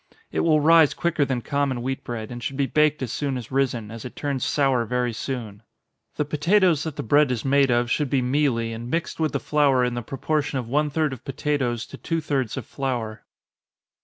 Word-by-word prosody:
It - - -1
will 155 -2 +4
rise 160 0 +5
quicker 170 -4 +1
than 125 -3 -2
common 140 -4 -1
wheat 135 +2 -3
bread, 115 -3 -5
and 120 0 -6
should 135 +4 -4
be 140 - +2
baked 150 0 +2
as 120 - -4
soon 140 -3 -2
as 120 -1 -8
risen, 125 -5 0
as 115 -1 -8
it 125 - -8
turns 140 -3 -2
sour 135 -4 +2
very 125 +1 -1
soon. 110 -4 -5 0.5
The 150 - 0
potatoes 165 +2 +3
that 160 -3 -4
the - - -4
bread 145 +5 +4
is 125 -2 -2
made 140 0 +4
of 120 0 +1
should 150 -3 +1
be 135 - +2
mealy, 125 -4 +1
and 115 +2 -6
mixed 165 +2 -2
with 155 -1 +1
the - - -1
flour 140 -4 +3
in 125 - -1
the 120 - -3
proportion 140 +4 -2
of 125 -3 -3
one 150 +4 +1
third 150 -1 0
of 130 - -10
potatoes 135 -4 -1
to - - -11
two 165 - -2
thirds 135 -7 -2
of - - -4
flour. 120 -6 -4
135 Hz, 220 wpm, -24 LUFS, 120-150 Hz, 0.5 s, rise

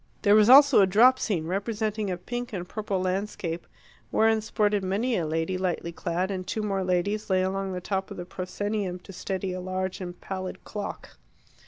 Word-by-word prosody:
There 205 -2 +5
was 215 +1 +6
also 280 -3 +8
a 195 - +5
drop 245 +7 +6
scene, 175 -8 -1
representing 210 +3 -2
a 180 - -2
pink 240 +6 -5
and 180 -2 -4
purple 205 -1 -2
landscape, 185 -2 -3 0.4
wherein 220 0 +3
sported 210 -2 +1
many 215 +7 0
a 170 -5 -1
lady 165 +4 -1
lightly 175 -2 -2
clad, 180 +3 -2
and 185 -1 -4
two 215 +3 -2
more 195 -2 -1
ladies 190 +4 0
lay 185 -1 +3
along 195 +1 -2
the 180 - -4
top 190 +1 -2
of - - -8
the 175 - -5
proscenium 185 +1 -3
to 195 - -12
steady 185 0 -3
a 185 - -4
large 185 +1 -3
and 175 -1 -7
pallid 185 -1 -6
clock. 210 -1 -7
190 Hz, 190 wpm, -27 LUFS, 185-210 Hz, 0.4 s, also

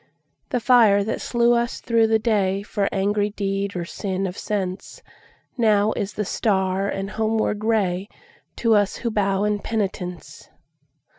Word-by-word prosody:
The 250 - 0
fire 225 -5 +5
that 220 - -3
slew 235 0 +2
us 235 0 0
through 230 -1 +2
the 220 0 +3
dayFor 200 -2 0
angry 205 +1 0
deed 200 -1 -3
or 175 -1 -3
sin 190 +2 -3
of 180 -1 -4
senseNow 210 +2 -2
is 200 0 -3
the 210 - -3
star 190 -1 0
and 195 0 -3
homeward 220 -1 0
rayTo 200 -4 0 0.7
us 205 -2 +2
who 235 - +1
bow 200 -2 +1
in 210 0 0
penitence. 190 -6 -4
205 Hz, 135 wpm, -23 LUFS, 195-220 Hz, 0.7 s, fire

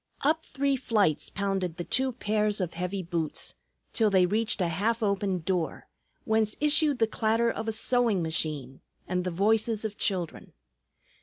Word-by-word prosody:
Up 315 +3 +2
three 280 0 0
flights 210 - +1
pounded 195 -4 -2
the 175 - -3
two 260 +8 +1
pairs 210 -2 0
of 180 -3 -2
heavy 180 +3 -3
boots, 165 -2 -2 0.4
till 220 -2 +3
they 190 -2 +4
reached 215 +5 +1
a 180 - +2
half 220 +8 0
open 200 -3 0
door, 175 -1 -2 0.4
whence 220 -1 +1
issued 300 -1 +3
the 225 - +3
clatter 225 +1 +1
of 220 0 -5
a - - +1
sewing 225 -4 +2
machine 150 -5 -2 0.3
and 180 0 -1
the 180 - -1
voices 215 +4 +1
of 210 -1 -4
children. 180 -5 -2
205 Hz, 160 wpm, -28 LUFS, 180-225 Hz, 0.4 s, they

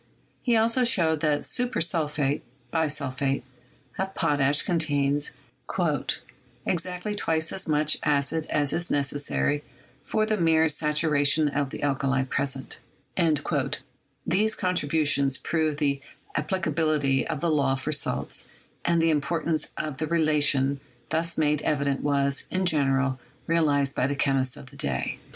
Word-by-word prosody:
He 240 -3 +2
also 230 +3 +3
showed 165 -10 +3
that 150 -1 0
"super 250 0 0
sulphate" 150 -4 0 0.3
(bisulphate) 140 -4 -1 0.6
of 190 0 -2
potash 145 -2 +2
con 175 -2 0
tains 145 -2 +1 1.4
"exactly 180 +3 -2
twice 160 -5 0
as 190 - -2
much 150 0 +2
acid 150 +2 +1
as 145 -2 0
is 175 0 -1
necessary 145 +1 0 0.4
for 215 0 0
the 215 0 0
mere 160 -2 +3
saturation 150 0 +2
of 140 -1 -1
the - - -7
alkali 135 -1 +1
present." 135 0 -2 1.5
These 215 +5 +2
contribu 160 -5 +1
tions 140 -2 +3
proved 155 -3 -1
the 140 -2 0 0.3
applicability 155 -4 0
of 155 -3 -3
the 170 +1 0
law 140 -3 +2
for 135 +3 -3
salts, 150 - -1 0.4
and 170 -1 +2
the 165 - +4
importance 155 +1 -1
of 150 -3 -4
the 155 - -2
relation 145 -4 +3 0.3
thus 165 +1 +1
made 150 -1 +2
evident 140 -2 0
was, 140 -1 +1
in 185 0 -1
general, 135 -4 +1 0.3
realized 145 -4 +2
by 130 - +1
the 140 - -1
chemists 135 -2 +1
of 130 - -12
the 140 - -14
day. 65 - -2
150 Hz, 135 wpm, -26 LUFS, 140-165 Hz, 1.5 s, the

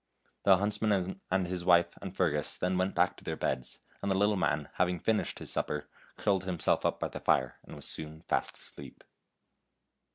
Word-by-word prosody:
The 95 -2 +7
huntsman 100 -2 0
and 95 0 +2
his 90 0 -3
wife 85 -1 +4
and 95 - -5
Fergus 75 -5 +1
then 90 +1 0
went 95 +1 0
back 90 +1 +3
to - - -14
their 80 - -2
beds, 65 -4 -3 0.2
and 100 - -1
the 95 - +2
lit 100 +1 +4
lie 105 - +1
man, 75 -6 0
hav 90 - +3
ing 90 -1 -2
finished 110 +3 0
his - - -4
supper, 75 - -2 0.3
curled 95 -2 +1
himself 90 -3 +1
up - - -2
by - - -1
the - - -6
fire, 65 -1 +1
and - - -11
was - - -7
soon 80 0 -2
fast - - -1
asleep. 70 -3 -10
90 Hz, 200 wpm, -31 LUFS, 80-95 Hz, 0.3 s, The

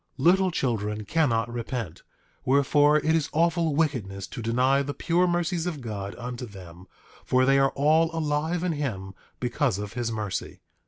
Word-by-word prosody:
8:19 135 - -3
Little 190 +2 +5
children 110 - -2
cannot 120 -6 +1
repent; 115 - -5 0.4
wherefore, 145 +2 +4
it 155 +1 +1
is 160 -2 0
awful 165 -1 +2
wickedness 115 -12 -1
to - - -8
deny 125 +5 +2
the 145 +1 -4
pure 175 +1 +1
mercies 175 0 0
of 165 -5 -3
God 100 -5 -5
unto 125 0 -6
them, 90 -3 -12 0.4
for 130 0 +2
they 135 +1 +4
are 135 0 +4
all 155 +3 +3
alive 160 +2 -1
in 180 - 0
him 110 -11 -4 0.3
because 125 -2 0
of 105 0 -6
his 120 -2 -2
mercy. 105 -4 -4
135 Hz, 165 wpm, -26 LUFS, 115-160 Hz, 0.4 s, Little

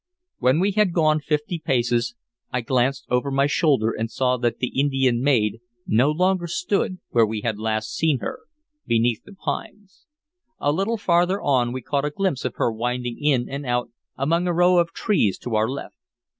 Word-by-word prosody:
When 130 +4 +3
we 195 +3 +2
had 205 -3 +2
gone 155 -2 +3
fifty 150 +3 -2
paces 120 - 0 0.4
I 125 - -1
glanced 130 +2 0
over 125 +3 +1
my 135 0 +2
shoulder 140 -6 +2
and 115 +1 -3
saw 125 +1 +1
that 120 -1 -1
the 125 - -2
Indian 135 -3 +1
maid 115 -6 +2 0.3
no 125 +6 +3
longer 180 +3 +1
stood 185 +2 -1
where 115 - +4
we 110 -1 -1
had 110 -1 -2
last 110 0 -2
seen 160 -4 +2
her, 260 - -5 0.5
beneath 115 -1 +2
the 205 - -14
pines. 205 - -6 0.5
A 145 - +1
little 195 +9 0
farther 180 0 +2
on 125 -4 +1
we 130 -1 -5
caught 140 +2 -1
a - - 0
glimpse 170 -3 -1
of 125 - -3
her 120 - +1
winding 120 +3 -3
in 135 -5 +2
and 140 +1 -5
out 120 -2 -1 0.3
among 165 +6 +1
a 175 - +1
row 175 +1 +4
of 170 -1 +1
trees 175 - +1
to 120 - -6
our 110 +1 +2
left. 140 +1 -6
135 Hz, 185 wpm, -23 LUFS, 120-170 Hz, 0.5 s, where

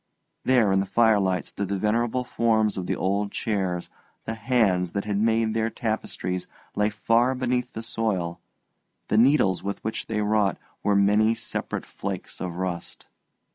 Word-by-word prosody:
There 120 -6 +4
in 95 - +3
the 95 - -1
firelight 100 -4 +3
stood 100 - -4
the 100 +1 -1
venerable 115 +5 +1
forms 110 -3 +1
of 90 -2 -4
the - - 0
old 100 +2 0
chairs; 95 -5 -2 0.4
the 115 - -2
hands 105 -7 +1
that 100 0 -2
had 100 -1 -1
made 110 0 +2
their 110 0 +1
tapestries 110 -6 -3 0.3
lay 105 0 +2
far 115 +5 +2
beneath 125 -1 -1
the 110 - -5
soil, 95 -7 -2 0.7
the 105 - +2
needles 120 -7 +4
with 100 0 -3
which 110 - -3
they 110 -1 -1
wrought 105 -3 +2 0.2
were 105 - +2
many 105 +3 +4
separate 115 - -4
flakes - - -6
of 90 -2 -3
rust. 90 -1 -4
105 Hz, 160 wpm, -25 LUFS, 95-115 Hz, 0.7 s, There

